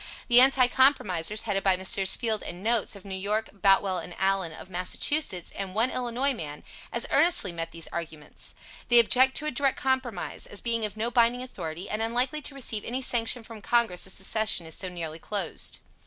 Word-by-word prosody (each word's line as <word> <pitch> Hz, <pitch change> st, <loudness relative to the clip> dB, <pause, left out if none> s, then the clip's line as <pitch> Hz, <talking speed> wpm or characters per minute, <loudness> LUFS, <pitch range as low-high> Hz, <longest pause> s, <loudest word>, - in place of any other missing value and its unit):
The 240 Hz, +1 st, +8 dB
Anti 265 Hz, -1 st, +6 dB
compromisers, 215 Hz, -, +2 dB
headed 205 Hz, -3 st, -1 dB
by 190 Hz, -2 st, +2 dB
Messrs. 190 Hz, +1 st, +3 dB
Field 220 Hz, -3 st, -1 dB
and 175 Hz, +2 st, -8 dB
Notes, 225 Hz, -2 st, +1 dB
of 200 Hz, -, -13 dB
New 195 Hz, -, -6 dB
York, 210 Hz, +3 st, -1 dB
Boutwell 195 Hz, -1 st, +2 dB
and 180 Hz, -, -8 dB
Allen, 190 Hz, -3 st, 0 dB
of 160 Hz, -, -11 dB
Massachusetts, 185 Hz, -, 0 dB
and 195 Hz, -1 st, -5 dB
one 230 Hz, +4 st, +2 dB
Illinois 255 Hz, +3 st, -1 dB
man, 150 Hz, -, -7 dB, 0.3 s
as 235 Hz, -, -1 dB
earnestly 295 Hz, -, +4 dB
met 165 Hz, -1 st, -4 dB
these 165 Hz, -1 st, -4 dB
arguments. 160 Hz, -3 st, -6 dB, 0.3 s
They 240 Hz, -, +5 dB
object 255 Hz, +3 st, +5 dB
to 305 Hz, -, -4 dB
a 305 Hz, -, -1 dB
Direct 275 Hz, +1 st, 0 dB
compromise, 260 Hz, -7 st, -2 dB
as 205 Hz, -, -1 dB
being 230 Hz, -2 st, 0 dB
of 210 Hz, 0 st, -6 dB
no 230 Hz, +2 st, -2 dB
binding 240 Hz, +1 st, +2 dB
authority, 175 Hz, -7 st, -6 dB
and 215 Hz, +1 st, -3 dB
unlikely 245 Hz, +6 st, 0 dB
to 285 Hz, -, -3 dB
receive 230 Hz, -6 st, -1 dB
any 255 Hz, +3 st, -3 dB
sanction 235 Hz, 0 st, +1 dB
from 225 Hz, -1 st, -11 dB
Congress 225 Hz, -5 st, +1 dB
as 190 Hz, -, -11 dB
the -, -, -14 dB
session 215 Hz, -4 st, +1 dB
is 160 Hz, -, -9 dB
so 185 Hz, -, -4 dB
nearly 165 Hz, -3 st, -6 dB
closed. 205 Hz, +3 st, -1 dB
215 Hz, 200 wpm, -27 LUFS, 185-245 Hz, 0.3 s, The